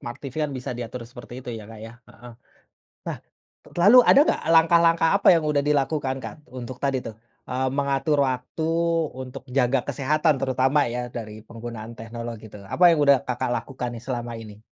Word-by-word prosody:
smart 120 Hz, +3 st, -7 dB
TV 135 Hz, -3 st, -8 dB
kan 150 Hz, -, -3 dB
bisa 130 Hz, -1 st, -5 dB
diatur 120 Hz, 0 st, -6 dB
seperti 120 Hz, -1 st, -11 dB
itu 125 Hz, -, -11 dB
ya, 105 Hz, -, -10 dB
Kak, 110 Hz, -1 st, -11 dB
ya, 115 Hz, +1 st, -9 dB, 0.2 s
heeh. 120 Hz, -1 st, -13 dB, 0.8 s
Nah, -, -, -3 dB, 0.6 s
lalu 215 Hz, +7 st, +8 dB
ada 275 Hz, -, +7 dB
nggak -, -, +1 dB
langkah-langkah 165 Hz, 0 st, +5 dB
apa 200 Hz, -, 0 dB
yang 165 Hz, -2 st, +2 dB
udah 145 Hz, -2 st, +1 dB
dilakukan, 140 Hz, -2 st, 0 dB
Kak, -, -, -7 dB, 0.2 s
untuk 125 Hz, 0 st, -7 dB
tadi 135 Hz, -1 st, +1 dB
tuh, 110 Hz, -, -7 dB, 0.3 s
eee, 130 Hz, +1 st, -1 dB
mengatur 140 Hz, +2 st, 0 dB
waktu 130 Hz, +5 st, -4 dB, 0.6 s
untuk 130 Hz, +1 st, -9 dB
jaga 130 Hz, 0 st, +2 dB
kesehatan 145 Hz, +2 st, +1 dB
terutama 130 Hz, +2 st, +2 dB
ya 125 Hz, 0 st, -3 dB
dari 110 Hz, -2 st, -8 dB
penggunaan 115 Hz, 0 st, -8 dB
teknologi 115 Hz, 0 st, -7 dB
tuh, 100 Hz, -, -11 dB
apa 180 Hz, -, 0 dB
yang 160 Hz, -, +2 dB
udah 140 Hz, -1 st, +6 dB
Kakak 125 Hz, 0 st, -2 dB
lakukan 125 Hz, -2 st, -5 dB
nih 115 Hz, -, -9 dB
selama 120 Hz, -2 st, -4 dB
ini? 110 Hz, -1 st, -12 dB
130 Hz, 180 wpm, -24 LUFS, 120-145 Hz, 0.8 s, lalu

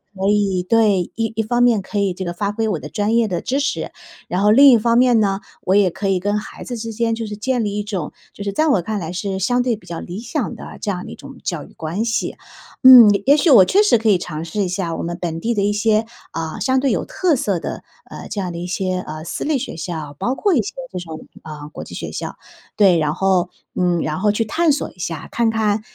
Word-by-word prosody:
可 190 Hz, +1 st, 0 dB
以 200 Hz, -3 st, +1 dB
对， 210 Hz, -1 st, +3 dB
一 225 Hz, -1 st, -2 dB
一 220 Hz, -, 0 dB
方 240 Hz, +3 st, 0 dB
面 235 Hz, -4 st, +4 dB
可 205 Hz, +2 st, -4 dB
以 195 Hz, -2 st, +1 dB
这 185 Hz, -, -6 dB
个 175 Hz, -, -3 dB
发 200 Hz, +3 st, -2 dB
挥 225 Hz, +1 st, -1 dB
我 180 Hz, -7 st, -1 dB
的 150 Hz, -, -8 dB
专 210 Hz, +5 st, -1 dB
业 230 Hz, -1 st, +3 dB
的 180 Hz, -4 st, -2 dB
知 270 Hz, +3 st, -1 dB
识， 295 Hz, +1 st, -2 dB, 0.4 s
然 180 Hz, -, -1 dB
后 210 Hz, +1 st, +4 dB
另 275 Hz, +5 st, +8 dB
一 240 Hz, -, +6 dB
方 230 Hz, +1 st, +2 dB
面 245 Hz, -2 st, +5 dB
呢， 195 Hz, -2 st, 0 dB, 0.2 s
我 190 Hz, -, +2 dB
也 200 Hz, -2 st, +4 dB
可 200 Hz, -, -4 dB
以 190 Hz, -, +2 dB
跟 205 Hz, +3 st, 0 dB
孩 210 Hz, -, -10 dB
子 245 Hz, -, -5 dB
之 225 Hz, 0 st, -5 dB
间 230 Hz, +1 st, 0 dB
就 225 Hz, -1 st, -5 dB
是 210 Hz, -, -5 dB
建 255 Hz, +2 st, -1 dB
立 205 Hz, 0 st, -2 dB
一 210 Hz, -, -1 dB
种， 200 Hz, -6 st, -4 dB, 0.2 s
就 -, -, -12 dB
是 200 Hz, -1 st, -3 dB
在 310 Hz, +9 st, +2 dB
我 210 Hz, -10 st, +3 dB
看 215 Hz, +5 st, -3 dB
来 165 Hz, 0 st, -5 dB
是 190 Hz, +1 st, -3 dB
相 245 Hz, +6 st, +1 dB
对 245 Hz, -2 st, 0 dB
比 205 Hz, -, -17 dB
较 170 Hz, -1 st, -6 dB
理 175 Hz, -, -7 dB
想 240 Hz, -, -3 dB
的 -, -, -10 dB
这 -, -, -2 dB
样 180 Hz, -2 st, -5 dB
的 -, -, -9 dB
一 -, -, -8 dB
种 -, -, -12 dB
教 -, -, -3 dB
育 -, -, -18 dB
关 170 Hz, +8 st, -3 dB
系。 230 Hz, -, -2 dB, 0.5 s
嗯， 250 Hz, -4 st, +10 dB, 0.2 s
也 280 Hz, +3 st, +6 dB
许 305 Hz, +2 st, +2 dB
我 200 Hz, -8 st, +8 dB
确 400 Hz, -, +4 dB
实 415 Hz, -, +4 dB
可 225 Hz, 0 st, -2 dB
以 200 Hz, -, +5 dB
尝 160 Hz, -2 st, -6 dB
试 185 Hz, +6 st, -3 dB
一 185 Hz, -, -2 dB
下 180 Hz, -3 st, -2 dB
我 -, -, -4 dB
们 170 Hz, +1 st, -4 dB
本 165 Hz, -2 st, -4 dB
地 235 Hz, +5 st, 0 dB
的 205 Hz, -, 0 dB
一 205 Hz, +1 st, +1 dB
些， 215 Hz, +1 st, +2 dB, 0.3 s
呃， 160 Hz, -1 st, -4 dB
相 260 Hz, 0 st, +2 dB
对 275 Hz, +1 st, +1 dB
有 -, -, 0 dB
特 360 Hz, -5 st, +1 dB
色 200 Hz, -8 st, -1 dB
的， -, -, -6 dB, 0.3 s
呃， -, -, -9 dB
这 210 Hz, -, -4 dB
样 180 Hz, -2 st, -3 dB
的 -, -, -6 dB
一 175 Hz, -, -5 dB
些， 185 Hz, 0 st, -2 dB
呃， 155 Hz, -2 st, -7 dB
私 -, -, -4 dB
立 305 Hz, -2 st, +1 dB
学 250 Hz, -, -5 dB
校， 160 Hz, -3 st, -5 dB
包 250 Hz, -, -1 dB
括 400 Hz, +6 st, +1 dB
一 -, -, +3 dB
些 205 Hz, -, -6 dB, 0.2 s
这 185 Hz, -, -4 dB
种， 160 Hz, -2 st, -9 dB, 0.2 s
呃， 150 Hz, -1 st, -8 dB
国 -, -, -8 dB
际 -, -, -10 dB
学 -, -, -5 dB
校。 -, -, -5 dB, 0.4 s
对， 190 Hz, -5 st, +5 dB
然 150 Hz, 0 st, 0 dB
后 185 Hz, -1 st, +1 dB, 0.3 s
嗯， 175 Hz, -2 st, +1 dB
然 155 Hz, +3 st, -2 dB
后 210 Hz, +2 st, +3 dB
去 225 Hz, +2 st, -1 dB
探 325 Hz, +8 st, +2 dB
索 285 Hz, -, -2 dB
一 180 Hz, -, -24 dB
下， 165 Hz, -3 st, -5 dB
看 235 Hz, -1 st, +1 dB
看， 220 Hz, -1 st, 0 dB
205 Hz, 290 characters per minute, -20 LUFS, 180-230 Hz, 0.5 s, 嗯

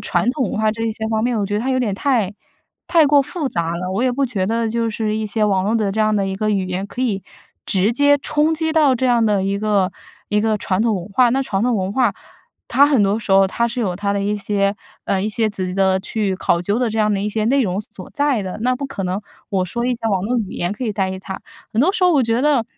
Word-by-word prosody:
传 235 Hz, -, 0 dB
统 260 Hz, -7 st, -2 dB
文 215 Hz, -, -2 dB
化 215 Hz, 0 st, +3 dB
这 225 Hz, -, -6 dB
一 225 Hz, -, 0 dB
些 220 Hz, 0 st, -4 dB
方 220 Hz, -1 st, 0 dB
面， 245 Hz, -2 st, 0 dB
我 200 Hz, -, 0 dB
觉 205 Hz, -, -3 dB
得 -, -, 0 dB
它 260 Hz, +3 st, -1 dB
有 255 Hz, -, +1 dB
点 210 Hz, -5 st, -1 dB
太 225 Hz, -4 st, 0 dB, 0.5 s
太 335 Hz, -3 st, +5 dB
过 285 Hz, 0 st, +5 dB
复 300 Hz, -1 st, -3 dB
杂 170 Hz, -3 st, -2 dB
了， 180 Hz, +1 st, -4 dB
我 225 Hz, -, 0 dB
也 255 Hz, -, +2 dB
不 275 Hz, +2 st, 0 dB
觉 200 Hz, -6 st, -2 dB
得 230 Hz, +1 st, 0 dB
就 230 Hz, 0 st, 0 dB
是 215 Hz, 0 st, -2 dB
一 220 Hz, -, -2 dB
些 215 Hz, +1 st, 0 dB
网 195 Hz, -2 st, +1 dB
络 215 Hz, +3 st, 0 dB
的 210 Hz, -3 st, +1 dB
这 220 Hz, -, -1 dB
样 215 Hz, 0 st, +2 dB
的 200 Hz, -1 st, +1 dB
一 190 Hz, -, -3 dB
个 215 Hz, +1 st, 0 dB
语 195 Hz, -3 st, 0 dB
言 185 Hz, +2 st, -3 dB
可 245 Hz, -, -7 dB
以 200 Hz, -6 st, -1 dB, 0.4 s
直 200 Hz, +4 st, +2 dB
接 285 Hz, +3 st, +4 dB
冲 305 Hz, +3 st, +1 dB
击 320 Hz, 0 st, -1 dB
到 300 Hz, -5 st, +4 dB
这 260 Hz, -, 0 dB
样 240 Hz, -2 st, +3 dB
的 205 Hz, -3 st, +1 dB
一 200 Hz, +1 st, -1 dB
个 200 Hz, -3 st, +1 dB, 0.4 s
一 210 Hz, 0 st, +2 dB
个 215 Hz, -1 st, +1 dB
传 185 Hz, +1 st, -1 dB
统 225 Hz, -2 st, +2 dB
文 180 Hz, +2 st, -6 dB
化。 245 Hz, +3 st, +4 dB
那 270 Hz, +2 st, +1 dB
传 200 Hz, -5 st, -2 dB
统 245 Hz, -1 st, +2 dB
文 190 Hz, 0 st, -2 dB
化， 245 Hz, -4 st, +2 dB, 0.6 s
它 275 Hz, +4 st, +5 dB
很 280 Hz, -5 st, +3 dB
多 200 Hz, +2 st, +2 dB
时 210 Hz, -, -7 dB
候 195 Hz, 0 st, +6 dB
它 235 Hz, +5 st, 0 dB
是 245 Hz, +2 st, -5 dB
有 190 Hz, -5 st, -1 dB
它 200 Hz, +2 st, -1 dB
的 200 Hz, -, -1 dB
一 205 Hz, +1 st, 0 dB
些 200 Hz, 0 st, 0 dB, 0.3 s
呃， 195 Hz, -1 st, 0 dB
一 210 Hz, -, 0 dB
些 220 Hz, 0 st, +1 dB
自己 185 Hz, -3 st, -4 dB
的 190 Hz, -1 st, +2 dB
去 205 Hz, -1 st, -1 dB
考 170 Hz, -2 st, +1 dB
究 205 Hz, +5 st, 0 dB
的 245 Hz, -, +1 dB
这 220 Hz, -, -3 dB
样 210 Hz, -1 st, +2 dB
的 195 Hz, -, -1 dB
一 210 Hz, -, -1 dB
些 215 Hz, 0 st, -1 dB
内 270 Hz, +4 st, +3 dB
容 190 Hz, -1 st, -1 dB
所 200 Hz, -3 st, -11 dB
在 285 Hz, -7 st, +1 dB
的， 185 Hz, +2 st, -5 dB
那 255 Hz, +1 st, +2 dB
不 280 Hz, +2 st, -5 dB
可 235 Hz, -8 st, -5 dB
能， 185 Hz, +3 st, -2 dB, 0.3 s
我 190 Hz, -2 st, +1 dB
说 235 Hz, +6 st, -3 dB
一 250 Hz, -, +1 dB
下 230 Hz, -1 st, -3 dB
网 190 Hz, -3 st, 0 dB
络 245 Hz, +3 st, 0 dB
语 210 Hz, -5 st, -3 dB
言 175 Hz, +3 st, -2 dB
可 210 Hz, -, -7 dB
以 215 Hz, -, -1 dB
代 190 Hz, -2 st, -1 dB
替 190 Hz, -, -6 dB
它。 190 Hz, 0 st, -7 dB, 0.3 s
很 225 Hz, -, +1 dB
多 365 Hz, +7 st, +3 dB
时 370 Hz, -, -2 dB
候 360 Hz, -, +5 dB
我 285 Hz, -, +4 dB
觉 230 Hz, +1 st, +1 dB
得， 285 Hz, -6 st, +3 dB
215 Hz, 315 characters per minute, -19 LUFS, 195-245 Hz, 0.6 s, 候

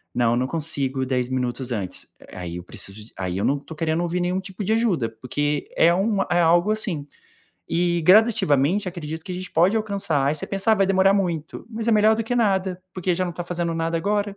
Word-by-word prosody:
não, 120 Hz, -1 st, +2 dB
não 130 Hz, +1 st, 0 dB
consigo 135 Hz, -4 st, -1 dB
10 125 Hz, -1 st, -1 dB
minutos 125 Hz, 0 st, -2 dB
antes, 100 Hz, -5 st, -4 dB, 0.3 s
aí 90 Hz, -2 st, -6 dB
eu 90 Hz, -, -7 dB
preciso 105 Hz, +4 st, -7 dB
aí 90 Hz, -1 st, -3 dB
eu 100 Hz, -, 0 dB
não 140 Hz, -, +2 dB
estou 155 Hz, +3 st, -11 dB
querendo 160 Hz, 0 st, 0 dB
ouvir 175 Hz, +1 st, -1 dB
nenhum 180 Hz, +1 st, 0 dB
tipo 190 Hz, +1 st, -7 dB
de 215 Hz, +3 st, +1 dB
ajuda, 205 Hz, -, +1 dB
porque 145 Hz, +3 st, -2 dB
é 170 Hz, +1 st, +5 dB
um 195 Hz, +2 st, +1 dB
é 175 Hz, -, +4 dB
algo 175 Hz, +5 st, +4 dB
assim. 175 Hz, -9 st, -2 dB, 0.6 s
E, 175 Hz, 0 st, +1 dB
gradativamente, 185 Hz, -, +4 dB
acredito 160 Hz, -2 st, -6 dB
que 185 Hz, -, -8 dB
a -, -, -3 dB
gente 185 Hz, 0 st, -6 dB
pode 180 Hz, +7 st, +3 dB
alcançar, 200 Hz, -10 st, 0 dB
aí 145 Hz, -, +2 dB
você 155 Hz, -, -5 dB
pensa: 195 Hz, +3 st, +1 dB
"Ah, -, -, +6 dB
vai 195 Hz, -2 st, +2 dB
demorar 195 Hz, 0 st, +4 dB
muito." 170 Hz, -6 st, -2 dB
Mas 225 Hz, +1 st, -3 dB
é 230 Hz, -, +4 dB
melhor 215 Hz, +1 st, +5 dB
do 225 Hz, -, -2 dB
que 245 Hz, -, -2 dB
nada, 190 Hz, -5 st, +1 dB
porque 185 Hz, -1 st, 0 dB
já 185 Hz, +1 st, 0 dB
não 175 Hz, -, -3 dB
está 175 Hz, -, -5 dB
fazendo 175 Hz, -1 st, -2 dB
nada 165 Hz, 0 st, -1 dB
agora. 205 Hz, +2 st, -1 dB
175 Hz, 220 wpm, -23 LUFS, 140-195 Hz, 0.6 s, Ah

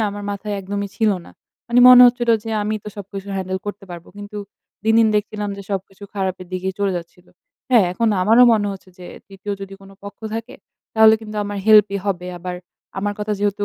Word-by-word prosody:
না -, -, +2 dB
আমার 205 Hz, 0 st, -7 dB
মাথায় 205 Hz, +1 st, -4 dB
একদমই 200 Hz, +1 st, -4 dB
ছিল 220 Hz, -2 st, +2 dB
না। -, -, -14 dB, 0.4 s
মানে 240 Hz, +1 st, +4 dB
মনে 250 Hz, 0 st, +10 dB
হচ্ছিল 240 Hz, -1 st, +1 dB
যে 225 Hz, -, -5 dB
আমিই 215 Hz, +1 st, -2 dB
তো -, -, -6 dB
সবকিছু 200 Hz, 0 st, -8 dB
হ্যান্ডেল 190 Hz, 0 st, -3 dB
করতে 205 Hz, -1 st, -6 dB
পারবো, 170 Hz, -1 st, -10 dB
কিন্তু 205 Hz, +1 st, -9 dB, 0.5 s
দিন, 220 Hz, 0 st, +3 dB
দিন 225 Hz, -, +4 dB
দেখছিলাম 210 Hz, 0 st, -3 dB
যে 200 Hz, -, -8 dB
সবকিছু 195 Hz, 0 st, -5 dB
খারাপের 190 Hz, -2 st, -3 dB
দিকেই 185 Hz, +1 st, -3 dB
চলে 200 Hz, -1 st, 0 dB
যাচ্ছিল। 175 Hz, +1 st, -10 dB, 0.4 s
হ্যাঁ, 230 Hz, -6 st, +6 dB
এখন 225 Hz, +4 st, 0 dB
আমারও 230 Hz, +5 st, +6 dB
মনে 210 Hz, -2 st, +1 dB
হচ্ছে 190 Hz, -1 st, -12 dB
যে 180 Hz, -, -10 dB, 0.2 s
৩য় 195 Hz, +1 st, -7 dB
যদি 195 Hz, 0 st, -8 dB
কোনো 195 Hz, 0 st, -15 dB
পক্ষ 200 Hz, -, -10 dB, 0.2 s
থাকে 230 Hz, +3 st, -6 dB, 0.4 s
তাহলে 220 Hz, 0 st, +7 dB
কিন্তু 215 Hz, -1 st, -8 dB
আমার 205 Hz, 0 st, -5 dB
হেল্পই 210 Hz, -2 st, +5 dB
হবে 180 Hz, -2 st, -2 dB
আবার 180 Hz, +1 st, -5 dB, 0.4 s
আমার 205 Hz, +1 st, -1 dB
কথা 210 Hz, 0 st, -2 dB
যেহেতু 205 Hz, 0 st, -1 dB
205 Hz, 200 wpm, -20 LUFS, 195-215 Hz, 0.5 s, মনে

